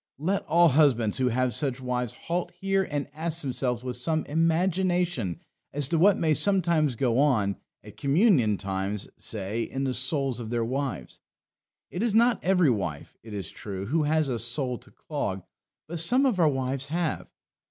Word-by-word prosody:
Let 185 Hz, +8 st, 0 dB
all 170 Hz, +2 st, +5 dB
husbands 130 Hz, -7 st, +3 dB
who 130 Hz, -, +2 dB
have 125 Hz, 0 st, 0 dB
such 135 Hz, -4 st, -1 dB
wives 125 Hz, -2 st, -2 dB
halt 175 Hz, +1 st, -4 dB
here 195 Hz, 0 st, +1 dB
and 145 Hz, -2 st, -2 dB
ask 165 Hz, +1 st, +1 dB
themselves 125 Hz, -2 st, -2 dB
with 125 Hz, -1 st, -2 dB
some 155 Hz, +5 st, -1 dB
imagination 170 Hz, -, 0 dB, 0.3 s
as 145 Hz, -2 st, -1 dB
to 165 Hz, -, +1 dB
what 195 Hz, +3 st, +5 dB
may 155 Hz, -2 st, +2 dB
sometimes 170 Hz, -6 st, +2 dB
go 120 Hz, 0 st, +1 dB
on, 110 Hz, -10 st, +2 dB, 0.3 s
at 105 Hz, 0 st, -13 dB
communion 140 Hz, -, +3 dB
times, 95 Hz, +1 st, -3 dB
say, 105 Hz, +1 st, -3 dB
in 135 Hz, +3 st, -3 dB
the 130 Hz, -1 st, 0 dB
souls 130 Hz, -1 st, -1 dB
of 115 Hz, -2 st, -6 dB
their 120 Hz, -1 st, 0 dB
wives. 135 Hz, +2 st, -4 dB, 0.7 s
It 180 Hz, -, -4 dB
is 225 Hz, -2 st, +1 dB
not 235 Hz, -1 st, +3 dB
every 180 Hz, -6 st, +4 dB
wife, 90 Hz, -10 st, -4 dB
it 110 Hz, -2 st, -9 dB
is 95 Hz, -5 st, -4 dB
true, 100 Hz, -2 st, -6 dB
who 155 Hz, +9 st, +1 dB
has 155 Hz, 0 st, +1 dB
a 125 Hz, -3 st, -2 dB
soul 125 Hz, +2 st, -1 dB
to -, -, -18 dB
clog; 100 Hz, -, -4 dB, 0.4 s
but 170 Hz, +1 st, -4 dB
some 250 Hz, -, +3 dB
of 235 Hz, -9 st, +1 dB
our 160 Hz, -3 st, +5 dB
wives 135 Hz, 0 st, -2 dB
have. 165 Hz, 0 st, -2 dB
140 Hz, 175 wpm, -27 LUFS, 120-165 Hz, 0.7 s, all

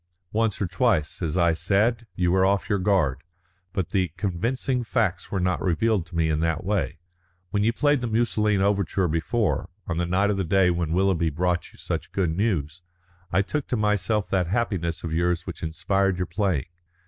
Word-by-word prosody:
"Once 110 Hz, -1 st, 0 dB
or 100 Hz, -, +1 dB
twice, 95 Hz, -, 0 dB
as 80 Hz, 0 st, -1 dB
I 85 Hz, -2 st, +4 dB
said, 105 Hz, +8 st, +1 dB
you 90 Hz, -1 st, +1 dB
were 95 Hz, +1 st, +3 dB
off 100 Hz, 0 st, +2 dB
your 100 Hz, -, +2 dB
guard, 90 Hz, -9 st, +1 dB, 0.5 s
but 95 Hz, -3 st, -3 dB
the 95 Hz, -3 st, +2 dB
convincing 115 Hz, +8 st, -1 dB
facts 110 Hz, -6 st, -1 dB
were 95 Hz, -, -1 dB
not 90 Hz, -1 st, 0 dB
revealed 95 Hz, +1 st, +1 dB
to 85 Hz, -, -11 dB
me 80 Hz, -1 st, +2 dB
in 80 Hz, -1 st, 0 dB
that 80 Hz, 0 st, 0 dB
way. 95 Hz, -4 st, -1 dB, 0.5 s
When 100 Hz, 0 st, +1 dB
you 115 Hz, -, +3 dB
played 145 Hz, +2 st, +2 dB
the 120 Hz, -, -1 dB
Musoline 105 Hz, -3 st, +1 dB
Overture 100 Hz, -2 st, +1 dB
before, 85 Hz, +7 st, 0 dB, 0.2 s
on 80 Hz, -, -3 dB
the 85 Hz, 0 st, 0 dB
night 100 Hz, +4 st, +2 dB
of 100 Hz, -, -1 dB
the 95 Hz, -, 0 dB
day 90 Hz, +1 st, +3 dB
when 85 Hz, -2 st, -1 dB
Willoughby 90 Hz, -2 st, +2 dB
brought 90 Hz, +3 st, -1 dB
you -, -, -19 dB
such -, -, -4 dB
good 85 Hz, -5 st, 0 dB
news, 90 Hz, -6 st, -1 dB, 0.5 s
I 95 Hz, +3 st, +3 dB
took 150 Hz, +7 st, -3 dB
to 125 Hz, -, -1 dB
myself 105 Hz, 0 st, +1 dB
that 90 Hz, -3 st, +1 dB
happiness 90 Hz, -5 st, -1 dB
of 80 Hz, -2 st, -3 dB
yours 85 Hz, +1 st, 0 dB
which 90 Hz, -, -7 dB
inspired 90 Hz, +4 st, 0 dB
your 90 Hz, -, -1 dB
playing. 90 Hz, -, 0 dB
95 Hz, 195 wpm, -25 LUFS, 85-105 Hz, 0.5 s, I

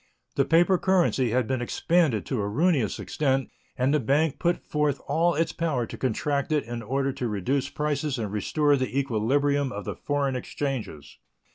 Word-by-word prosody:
The -, -, +2 dB
paper 175 Hz, +3 st, +4 dB
currency 175 Hz, -9 st, +2 dB
had 125 Hz, +1 st, +1 dB
been 130 Hz, +1 st, -2 dB
expanded 145 Hz, -, +1 dB
to 125 Hz, -6 st, -2 dB
a 100 Hz, -, -2 dB
ruinous 145 Hz, -, +1 dB
extent, 135 Hz, -3 st, -1 dB, 0.3 s
and 130 Hz, +3 st, +2 dB
the 150 Hz, -, +3 dB
bank 145 Hz, +4 st, +1 dB
put 175 Hz, 0 st, +1 dB
forth 150 Hz, -2 st, 0 dB
all 170 Hz, +1 st, +2 dB
its 165 Hz, +1 st, 0 dB
power 155 Hz, -8 st, -1 dB
to -, -, -8 dB
contract 140 Hz, +3 st, -1 dB
it 150 Hz, -2 st, +2 dB
in 120 Hz, 0 st, -6 dB
order 135 Hz, +4 st, -1 dB
to 125 Hz, -, -3 dB
reduce 120 Hz, +6 st, -1 dB
prices 150 Hz, -2 st, -2 dB
and 110 Hz, -4 st, -3 dB
restore 145 Hz, +8 st, +2 dB
the 130 Hz, 0 st, -2 dB
equilibrium 140 Hz, +3 st, +1 dB
of 105 Hz, -4 st, -6 dB
the -, -, -4 dB
foreign 140 Hz, -2 st, -1 dB
exchanges. 125 Hz, -, -5 dB
140 Hz, 175 wpm, -26 LUFS, 120-150 Hz, 0.3 s, paper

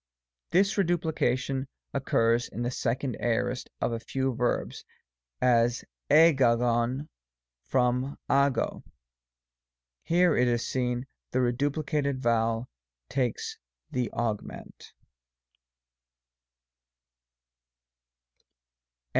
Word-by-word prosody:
This 195 Hz, +3 st, +2 dB
reduplication 140 Hz, -7 st, 0 dB, 0.3 s
occurs 120 Hz, -3 st, +1 dB
in 120 Hz, -, -4 dB
the 120 Hz, -, -1 dB
Second 125 Hz, 0 st, -2 dB
Aor. 125 Hz, +2 st, 0 dB, 0.2 s
of -, -, 0 dB
a 115 Hz, -, -2 dB
few 130 Hz, +2 st, -2 dB
verbs; 120 Hz, +1 st, -1 dB, 0.6 s
as, 120 Hz, -1 st, +2 dB, 0.2 s
riyayov 125 Hz, -3 st, +4 dB, 0.6 s
from 125 Hz, -, +1 dB
uycD. 140 Hz, -1 st, +1 dB, 1.2 s
Here, 175 Hz, +1 st, +3 dB
it 125 Hz, -, +3 dB
is 120 Hz, -1 st, +1 dB
seen, 125 Hz, -1 st, -1 dB, 0.2 s
the 130 Hz, -, 0 dB
re 120 Hz, -, +3 dB
duplicated 145 Hz, +1 st, -1 dB
vowel 115 Hz, -1 st, +1 dB, 0.4 s
takes 130 Hz, -4 st, -2 dB, 0.3 s
the 125 Hz, -2 st, -1 dB
augment. 110 Hz, -3 st, -5 dB
125 Hz, 80 wpm, -28 LUFS, 120-140 Hz, 1.2 s, riyayov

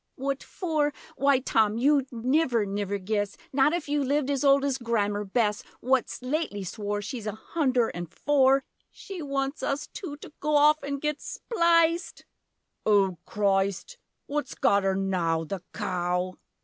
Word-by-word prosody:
What 275 Hz, +1 st, -2 dB
for? 310 Hz, -5 st, -1 dB, 0.2 s
Why 280 Hz, -1 st, +4 dB
Tom, 220 Hz, -4 st, +2 dB
you'd 275 Hz, +1 st, +2 dB
niver 250 Hz, -1 st, +1 dB
niver 200 Hz, 0 st, -2 dB
guess! 205 Hz, +1 st, -2 dB, 0.2 s
Not 270 Hz, +2 st, +4 dB
if 345 Hz, -2 st, -2 dB
you 290 Hz, 0 st, +1 dB
lived 285 Hz, +1 st, +1 dB
as 280 Hz, 0 st, 0 dB
old 275 Hz, 0 st, +5 dB
as 270 Hz, -2 st, 0 dB
Grammer 210 Hz, -4 st, 0 dB
Bess 210 Hz, 0 st, 0 dB, 0.2 s
What's 260 Hz, 0 st, 0 dB
lately 255 Hz, -7 st, -2 dB
swore 205 Hz, +2 st, -3 dB
She's 220 Hz, +1 st, -5 dB
a 210 Hz, -, -2 dB
hunder 255 Hz, 0 st, 0 dB
an' 175 Hz, 0 st, -5 dB
four 270 Hz, -, +3 dB, 0.3 s
She 385 Hz, -3 st, -8 dB
wants 275 Hz, 0 st, -2 dB
us 290 Hz, +1 st, -1 dB
two, 305 Hz, -7 st, -7 dB
to 295 Hz, -, -12 dB
go 300 Hz, +1 st, 0 dB
off 300 Hz, +1 st, +5 dB
an' 280 Hz, 0 st, -2 dB
git 300 Hz, +1 st, -2 dB
spliced! 335 Hz, -5 st, +1 dB, 0.6 s
Oh 195 Hz, -4 st, +3 dB
Christ! 200 Hz, -, 0 dB, 0.3 s
What's 290 Hz, -3 st, -3 dB
got 200 Hz, 0 st, +3 dB
'er 195 Hz, 0 st, +1 dB
now: 180 Hz, -4 st, 0 dB
The 185 Hz, +3 st, -5 dB
cow! 180 Hz, -2 st, -1 dB
255 Hz, 155 wpm, -27 LUFS, 205-290 Hz, 0.6 s, old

